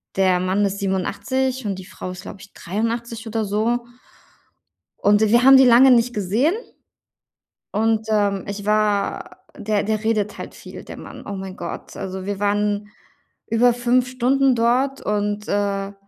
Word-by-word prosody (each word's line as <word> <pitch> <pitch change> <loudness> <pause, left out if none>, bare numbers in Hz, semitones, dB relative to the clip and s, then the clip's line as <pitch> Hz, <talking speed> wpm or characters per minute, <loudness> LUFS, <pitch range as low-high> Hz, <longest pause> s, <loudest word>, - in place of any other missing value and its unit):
der 185 -2 +3
Mann 190 +3 0
ist 200 0 -1
87 250 +7 -2
und 200 - -1
die 185 - -10
Frau 185 - -7
ist, 180 - -9
glaube 195 - -10
ich, 200 - -15
83 230 +4 -4
oder 225 -1 -2
so 225 +4 0 1.1
und 205 +1 +3
wir 235 +3 +4
haben 270 0 +9
die 265 - +7
lange 250 +2 +7
nicht 245 0 +3
gesehen 215 - +1 1.2
und, 220 0 0
ähm, 200 -3 +1
ich 200 0 -6
war 210 -1 0 0.2
der 210 -1 -1
der 215 0 -2
redet 210 -2 0
halt - - -8
viel, - - -11
der - - -10
Mann, - - -11
oh 200 - -5
mein 190 0 -7
Gott. 170 - -7
Also, 190 -1 -5
wir 200 0 -3
waren 205 0 0 0.6
über 235 +1 +3
5 245 +1 +1
Stunden 260 +1 +2
dort 255 +4 +1
und, 210 0 -2
äh 200 -1 -1
210 Hz, 160 wpm, -21 LUFS, 200-235 Hz, 1.2 s, haben